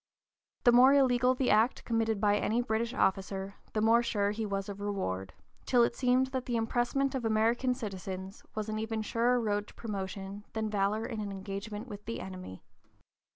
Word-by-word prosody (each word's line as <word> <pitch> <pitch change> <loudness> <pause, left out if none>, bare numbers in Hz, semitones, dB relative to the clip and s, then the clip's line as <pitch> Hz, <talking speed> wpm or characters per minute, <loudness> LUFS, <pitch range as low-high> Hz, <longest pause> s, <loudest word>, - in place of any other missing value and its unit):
The 240 - +7
more 255 +3 +7
illegal 255 -2 +4
the 255 0 +1
act 220 +4 +3
committed 225 -2 0
by 205 0 +3
any 220 +2 +1
British 230 0 -1
officer 195 -4 0 0.2
the 215 - 0
more 225 +2 +5
sure 205 -4 0
he 215 +1 -3
was 195 -1 -2
of 200 0 -7
reward, 95 - -3 0.4
till 245 -2 +5
it 235 - +1
seemed 255 +1 +2
that 260 -1 -2
the 240 - -1
impressment 240 +4 0
of 260 -3 -2
American 230 +3 +2
citizens 190 -4 -6
was 215 0 -2
an 215 0 -2
even 220 0 -2
surer 240 +3 +2
road 210 -2 -1
to - - -16
promotion 200 -2 -5
than 220 -1 -2
valor 210 +2 0
in 225 -3 -4
an 205 -1 -3
engagement 200 +3 -6
with 205 -3 -8
the 230 - -4
enemy. 185 - -8
220 Hz, 185 wpm, -31 LUFS, 200-240 Hz, 0.4 s, The